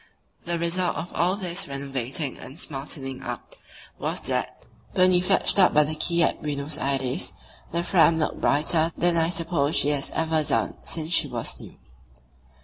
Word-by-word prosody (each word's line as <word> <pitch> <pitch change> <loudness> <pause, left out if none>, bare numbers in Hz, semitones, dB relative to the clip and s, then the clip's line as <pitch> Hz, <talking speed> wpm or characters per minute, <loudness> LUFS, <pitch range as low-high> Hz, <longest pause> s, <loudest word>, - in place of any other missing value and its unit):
The 170 0 -1
result 170 +2 0
of 170 +2 -5
all 180 +3 +2
this 185 -1 -5
renovating 140 0 -3
and 135 - -10
smartening 135 -3 -5
up - - -6 0.5
was - - -2
that, - - -3 0.3
when 185 0 +5
we 180 -1 +4
fetched 195 +2 +3
up 185 - +5
by 150 - +7
the 150 +1 -2
quay 170 +2 +2
at - - 0
Buenos 145 +1 -3
Aires, 135 -2 -1 0.4
the 170 +1 -1
Fram 170 -2 +4
looked 155 - -1
brighter 155 +3 +2
than 175 -1 +4
I 165 0 +3
suppose 165 -4 0
she 145 - +3
has 145 -2 0
ever 160 -1 +1
done 150 - 0
since 160 0 -5
she - - +4
was - - -4
new. - - -11
160 Hz, 170 wpm, -25 LUFS, 140-175 Hz, 0.5 s, by